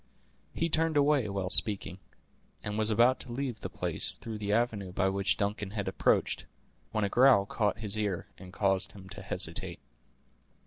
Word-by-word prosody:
He 165 - 0
turned 160 -1 +1
away 140 -6 +3
while 95 -2 -3
speaking, 100 -4 +2 0.6
and 105 - -3
was 110 0 0
about 120 +4 +4
to 120 - -7
leave 125 -2 -3
the - - -6
place - - +4
through 110 -2 -7
the 105 -1 -2
avenue 105 -4 0
by 95 +1 +1
which 100 0 0
Duncan 105 -1 -2
had 100 -1 -4
approached, - - 0 0.4
when 110 - -1
a - - +2
growl 120 -2 +5
caught 105 0 -1
his 110 -2 -4
ear, 105 -4 -2
and 90 -1 -11
caused 95 -2 0
him 95 -2 -12
to - - -7
hesitate. - - -4
105 Hz, 175 wpm, -30 LUFS, 100-120 Hz, 0.6 s, growl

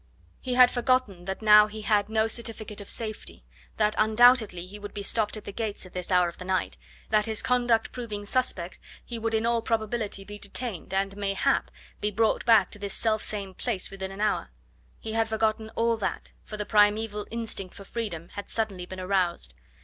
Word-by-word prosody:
He 250 -1 -3
had 250 -1 +7
forgotten 245 -8 0
that 190 +3 -5
now 210 0 +8
he 215 0 -8
had 210 -1 +2
no 220 0 +2
certificate 220 -2 -2
of 200 - -10
safety, 220 -2 -4 0.3
that 215 -1 +2
undoubtedly 220 -4 +5
he 205 +3 -10
would 205 0 -9
be 200 - -4
stopped 215 +1 0
at 210 - -10
the - - -5
gates 210 -2 -4
at 185 - -14
this 180 -1 -4
hour 180 -1 +4
of 170 - -8
the - - -6
night; 185 0 -1 0.4
that 215 0 +3
his 220 -1 -1
conduct 240 -3 +2
proving 215 -5 -5
suspect 205 -7 -1 0.3
he 235 -2 -5
would 225 0 -1
in 220 +1 +1
all 235 0 +2
probability 220 -2 -1
he 205 0 -8
detained, 200 -3 -4
and, 195 0 0
mayhap, 200 -1 +1 0.3
be 210 - 0
brought 220 +2 +1
back 230 -1 +5
to 210 - -6
this 200 -1 -2
self 220 -1 +1
same 200 -3 -4
place 185 +1 -2
within 190 -1 -5
an 195 +2 -7
hour. 210 - 0 0.5
He 220 - -5
had 225 0 +1
forgotten 220 0 0
all 230 0 +2
that, 215 - -3
for 215 - -7
the 210 - -3
primeval 210 0 +2
instinct 225 -5 -4
for 200 - -10
freedom 190 -8 -5
had 205 - -8
suddenly 195 -5 -2
been 185 0 -8
aroused. 185 - 0
210 Hz, 200 wpm, -27 LUFS, 195-225 Hz, 0.5 s, now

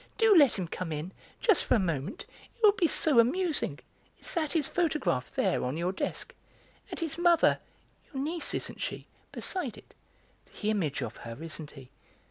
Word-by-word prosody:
Do 450 -3 +5
let 290 -9 +6
him 185 -3 -3
come 170 0 -5
in; 155 +4 -4 0.3
just 430 -8 +4
for - - +3
a - - +3
moment; 165 - -3 0.3
it 465 - -18
will 420 - +9
be 365 -4 +1
so 300 -5 +5
amusing. 315 +7 +1 0.4
Is - - -5
that 315 -4 -1
his 315 -5 +2
photograph 300 - 0
there, - - +1
on 130 +4 -2
your 175 +2 0
desk? 190 - -4 0.6
And - - -6
his 330 -1 -2
mother 345 -1 +4 0.5
(your 270 -1 -3
niece, 330 +3 -1
isn't - - -4
she?) - - -4 0.3
beside 340 - -3
it? - - -16 0.7
The 215 - 0
image 150 -10 -1
of 115 -2 -6
her, 115 -1 -8
isn't 155 -2 -6
he? 135 -4 -14
250 Hz, 180 wpm, -29 LUFS, -, 0.7 s, will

